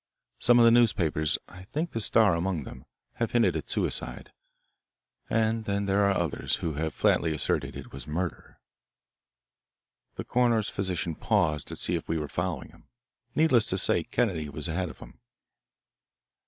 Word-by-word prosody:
Some 120 0 +5
of 120 - +7
the 115 - +7
newspapers, 90 -10 +2
I 95 - -12
think 155 - -3
the 115 - -3
Star 110 -2 +4
among 85 -2 -1
them, 65 +2 -11 0.3
have 115 -2 -2
hinted 120 -1 +3
at - - -4
suicide. - - -2 1.0
And 110 0 +1
then 100 0 -1
there 100 +1 +2
are 100 - +1
others, 85 -5 -1
who 80 - -3
have 80 +1 -3
flatly 80 -2 +2
asserted 75 - -1
it - - -9
was 65 0 -8
murder." 85 +2 -4 1.6
The - - -5
coroner's 120 -3 +1
physician 90 -3 -2
paused 75 -1 +1
to - - -6
see - - -2
if - - -3
we 80 - +1
were 75 -1 -3
following - - -3
him. - - -21 0.5
Needless 130 -8 +4
to 95 - 0
say 85 -2 +2
Kennedy 90 -11 -1
was 70 +2 -5
ahead 90 +2 -2
of - - -11
him. - - -14
95 Hz, 165 wpm, -28 LUFS, 80-115 Hz, 1.6 s, of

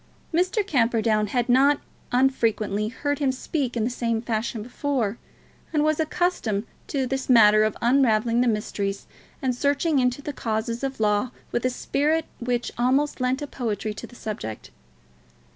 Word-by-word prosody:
Mr. 365 +5 +1
Camperdown 230 - +2
had 240 +3 0
not 275 +3 +4 0.3
unfrequently 225 -5 +1
heard 285 +6 -2
him 275 -3 +2
speak 260 -1 -3
in 225 - +1
the 235 - +1
same 230 -2 -1
fashion 225 -1 -2
before, 245 -3 -2 0.5
and 300 -2 +2
was 310 0 +1
accustomed 315 - 0 0.2
to 270 -3 -1
his 265 +1 -3
manner 215 -3 +7
of 215 -1 +1
unravelling 235 -2 +3
the 250 - +2
mysteries 205 -2 -2 0.4
and 255 -1 +1
searching 285 +3 +1
into 250 +1 +1
the 290 +1 -5
causes 230 +1 -2
of 270 -2 -3
Law 210 +3 +2 0.2
with 240 - -1
a - - +1
spirit 300 +5 0
which 240 0 -1
almost 265 +3 +1
lent 255 +3 0
poetry 220 -3 -2
to - - -8
the 245 - -16
subject. 155 - -6
245 Hz, 155 wpm, -25 LUFS, 220-275 Hz, 0.5 s, manner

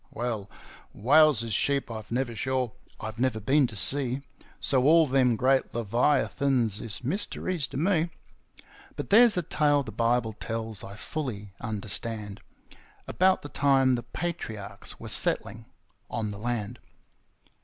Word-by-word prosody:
Well, 110 -4 -4 0.5
whales 145 +1 +5
is 115 -2 -4
sheep 140 0 0
I've 110 -2 -7
never 120 -1 -1
shore; 130 0 -1 0.3
I've 110 +1 -6
never 125 -3 +1
been 135 +5 +3
to 110 - -10
sea, 130 +5 +2 0.4
So 130 -2 +1
all 160 +2 +6
them 130 -3 +3
great 130 +2 +1
Leviathans 120 -1 +1
is 110 0 -4
mysteries 175 - -1
to - - -7
me; 170 +1 +1 0.9
But - - -6
there's 230 -1 +6
a 180 - +1
tale 145 -2 +2
the 115 - -8
Bible 115 +1 0
tells 110 -1 -4
I 100 +1 -8
fully 110 -6 -5
understand, 105 -1 -2 0.7
About 185 +1 +2
the 145 - -7
time 135 -2 +3
the 120 - 0
Patriarchs 120 - -6
were - - -8
settling - - 0 0.4
on 110 -2 -3
the 100 - -8
land. 115 0 -3
125 Hz, 140 wpm, -27 LUFS, 110-140 Hz, 0.9 s, all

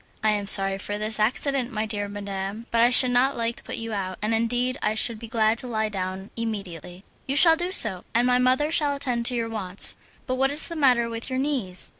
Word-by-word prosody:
"I 215 - +2
am 205 -1 -3
sorry 195 0 +5
for 205 +1 -5
this 215 +1 0
accident, 255 +3 0
my 215 -2 -3
dear 205 -2 -4
madam, 200 +1 -6
but 230 - +1
I 240 - +5
should 250 0 +7
not 260 +3 +1
like 230 0 -2
to - - -10
put - - -6
you 225 -1 -6
out, 185 -2 -5
and 215 +2 -2
indeed 245 +3 -1
I 215 - -1
should 225 0 -1
be 230 - -9
glad 220 0 0
to 255 - -7
lie 220 -2 -2
down 190 -1 -6
immediately." 195 -6 -7 0.2
"You 270 - -2
shall 325 +3 +7
do 350 +2 -4
so, 205 - +4
and 235 +1 +1
my 250 0 +2
mother 255 +4 +1
shall 295 -3 0
attend 250 -4 -2
to 250 - -1
your 230 -1 -2
wants. 200 -4 +1 0.3
But 255 -1 -3
what 270 - +2
is 290 +2 +3
the 335 - -7
matter 250 -6 +2
with 230 +2 -7
your 260 - -3
knees?" 260 -10 -2
230 Hz, 240 wpm, -23 LUFS, 205-255 Hz, 0.3 s, should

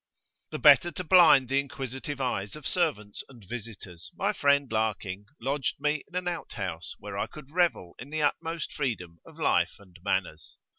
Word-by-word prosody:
11]The - - -5
better 150 +4 +7
to 185 - -4
blind 160 -7 +7
the 135 +2 +2
inquisitive 140 0 -5
eyes 105 -7 -2
of 150 -2 -11
servants 140 - -1
and 120 -7 -15
visitors, 100 -7 -8
my - - 0
friend, 140 -2 +2
Larking, 105 -3 -1
lodged 135 +3 -1
me 150 0 0
in 180 - -15
an 180 0 -1
out 175 -2 -4
house, 90 -5 -5
where 100 -1 -6
I - - 0
could 145 -2 -12
revel 165 - +1
in 130 - -9
the 155 0 -1
utmost 165 +2 -1
freedom 90 - -3
of - - -15
life - - +2
and 95 -3 -19
manners. 85 -6 -2
135 Hz, 180 wpm, -28 LUFS, 100-150 Hz, -, better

